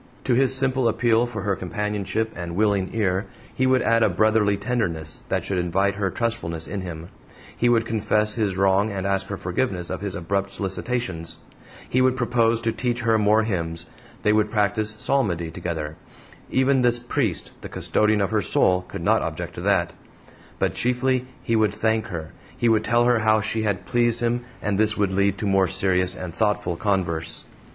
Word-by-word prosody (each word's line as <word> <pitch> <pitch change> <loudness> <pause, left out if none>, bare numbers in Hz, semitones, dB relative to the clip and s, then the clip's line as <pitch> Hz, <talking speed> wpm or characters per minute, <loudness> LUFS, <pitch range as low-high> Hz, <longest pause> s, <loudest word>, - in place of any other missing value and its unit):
To - - +1
his 130 +1 +4
simple 130 -2 +2
appeal 115 +1 +2
for 110 -5 -6
her 100 -1 0
companionship 105 +4 -2
and 85 -1 -5
willing 100 -2 +1
ear 100 -2 0 0.3
he 130 - +1
would 130 -1 +3
add 115 0 +3
a 110 - +4
brotherly 105 +2 +2
tenderness, 100 -8 -2
that - - 0
should 95 -2 -1
invite 95 +3 +1
her 100 0 -1
trustfulness 90 -7 -3
in 100 -1 -4
him; 85 -2 -7 0.5
he 120 - +2
would 115 -2 +3
confess 105 -1 +1
his 105 -5 -1
wrong 95 +2 +3
and 100 -2 -4
ask 95 0 0
her 100 - -4
forgiveness 90 -1 -2
of - - -4
his 100 -2 -4
abrupt 100 +3 -1
solicitations; 100 -3 -4 0.5
he 130 - +1
would 130 0 +3
propose 115 -2 +2
to 115 - +1
teach 120 +1 -2
her 115 -1 +2
more 105 +1 +4
hymns, 85 -6 -3 0.4
they 105 - +4
would 105 0 +2
practice 105 0 0
psalmody 85 -14 0
together; 80 -2 -4 0.5
even 130 0 +3
this 120 -1 +4
priest, 120 - -2
the - - -8
custodian 105 -1 +1
of 100 +2 0
her 110 -1 +2
soul, 90 -2 +2
could - - -7
not - - +3
object - - -4
to - - -7
that; - - +1 0.6
but - - 0
chiefly 125 +1 +1 0.2
he 115 - 0
would 110 -2 +2
thank 110 +1 0
her: 80 -5 -6 0.3
he 120 - +1
would 110 -2 +3
tell 120 +1 +2
her 120 -1 +3
how 110 0 +3
she 110 +1 -1
had 100 -4 -1
pleased 120 -1 +1
him, 120 +1 0 0.2
and 105 -1 0
this 110 +1 +3
would 100 -2 +1
lead 100 +1 +1
to 105 - -4
more 95 -1 +3
serious 90 0 +1
and 90 -2 -6
thoughtful 105 -4 0
converse. 85 -4 -1
105 Hz, 190 wpm, -23 LUFS, 95-115 Hz, 0.6 s, his